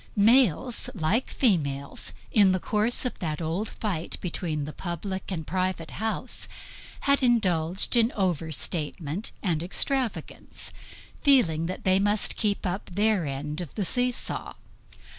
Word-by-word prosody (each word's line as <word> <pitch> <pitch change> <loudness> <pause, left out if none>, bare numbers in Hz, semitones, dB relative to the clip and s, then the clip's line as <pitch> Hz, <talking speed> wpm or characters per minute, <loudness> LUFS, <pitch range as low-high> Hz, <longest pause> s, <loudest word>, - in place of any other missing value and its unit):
Males, 235 - +4
like 195 +8 +1
females, 140 - 0 0.2
in 200 -4 +5
the 185 - +1
course 215 +7 +2
of 250 - -3
that 155 -4 -2
old 170 +6 -2
fight 180 -7 -3
between 160 -4 -2
the 150 - -7
public 190 +2 -4
and 160 -4 -3
private 185 -1 -2
house, 220 0 -3 0.5
had 280 0 +3
indulged 190 -7 +3
in 235 0 +4
overstatement 165 0 -2
and 170 -6 +1
extravagance, 245 +7 -2 0.5
feeling 165 - +4
that 185 - -5
they 190 0 +4
must 205 +1 +1
keep 205 -2 0
up 185 +2 -3
their 205 -3 +2
end 145 +4 -3
of 170 - -8
the 205 - -1
see 250 +6 +2
saw. 245 - -3
185 Hz, 135 wpm, -27 LUFS, 160-220 Hz, 0.5 s, in